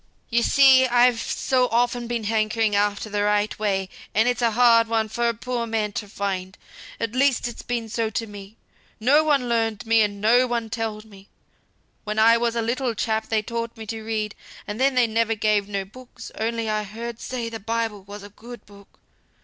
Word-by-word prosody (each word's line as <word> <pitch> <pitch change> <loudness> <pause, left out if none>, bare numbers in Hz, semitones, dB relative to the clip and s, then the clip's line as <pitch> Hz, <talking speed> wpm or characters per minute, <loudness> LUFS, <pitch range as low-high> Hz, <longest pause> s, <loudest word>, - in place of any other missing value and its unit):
"You 235 +1 +3
see 265 0 +6
I've 245 -1 +4
so 255 +1 0
often 240 0 0
been 235 -1 -3
hankering 215 0 0
after 205 +1 0
the 205 -1 -2
right 210 +1 0
way; 195 -3 0 0.3
and 220 +3 +3
it's 245 0 0
a 235 - +3
hard 230 0 +4
one 225 -1 0
for 235 +2 0
a - - -1
poor 240 +1 -3
man 220 -2 -1
to 205 0 -5
find. 195 -2 -4 0.4
At 230 -1 -3
least 260 -2 +2
it's 240 - -8
been 235 -2 -3
so 225 0 -2
to 225 +1 -3
me. 205 0 -12 0.4
No 280 +7 +4
one 285 -5 +1
learned 225 -2 -1
me, 225 0 +4
and 205 -1 -1
no 240 +5 +4
one 235 -2 -3
telled 225 -2 -4
me. 200 -2 -16 0.8
When 210 0 -4
I 225 +1 +6
was 235 0 0
a 230 - 0
little 240 +1 -1
chap 220 0 -1
they 220 -1 +1
taught 230 +1 -5
me 220 - -8
to 225 +1 -5
read, 215 -1 -3 0.3
and 210 +2 -6
then 270 0 +3
they 250 -1 +4
ne'er 225 0 0
gave 210 -1 +1
me 205 - -13
no 195 -1 -2
books; 250 +5 -12
only 230 0 -2
I 215 0 0
heard 230 +3 -7
say 245 -2 -4
the 225 -1 -6
Bible 225 -1 -3
was 200 +1 -10
a 205 - -10
good 235 +2 -12
book. 200 -1 -18
225 Hz, 205 wpm, -23 LUFS, 210-235 Hz, 0.8 s, see